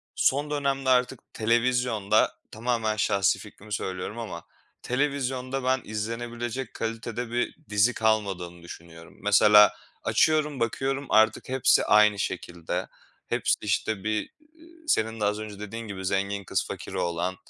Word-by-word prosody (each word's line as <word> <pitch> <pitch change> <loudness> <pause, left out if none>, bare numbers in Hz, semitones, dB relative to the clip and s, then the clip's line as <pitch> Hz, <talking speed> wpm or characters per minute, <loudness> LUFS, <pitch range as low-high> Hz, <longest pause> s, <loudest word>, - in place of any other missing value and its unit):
Son 145 +2 +1
dönemde 135 -2 0
artık 125 0 +2
televizyonda, 115 -2 +2 0.2
tamamen 110 -1 -1
şahsi 100 -2 +2
fikrimi 105 +1 -11
söylüyorum, 95 +4 -4
ama 90 -7 -6 0.4
televizyonda 130 -1 -1
ben 130 -1 +1
izlenebilecek 120 +3 -4
kalitede 115 +1 -4
bir 120 0 -1
dizi 105 +4 +3
kalmadığını 95 -6 -1
düşünüyorum. 85 -1 -12
Mesela 105 0 +7 0.3
açıyorum 150 -3 +2
bakıyorum 135 +4 -1
artık 110 +3 +3
hepsi 130 -1 +3
aynı 105 -1 +5
şekilde. 90 -1 -3 0.4
Hepsi, - - +1
işte, 105 -1 -1
bir, 110 0 +1 0.3
eee, 325 0 -18 0.2
senin 110 - +1
de 105 - +1
az 105 +1 0
önce 105 -2 -7
dediğin 110 +2 -6
gibi 95 -2 -6
zengin 100 +1 -1
kız - - -1
fakir - - -7
oğlan, 85 +2 -1
110 Hz, 130 wpm, -26 LUFS, 100-125 Hz, 0.4 s, Mesela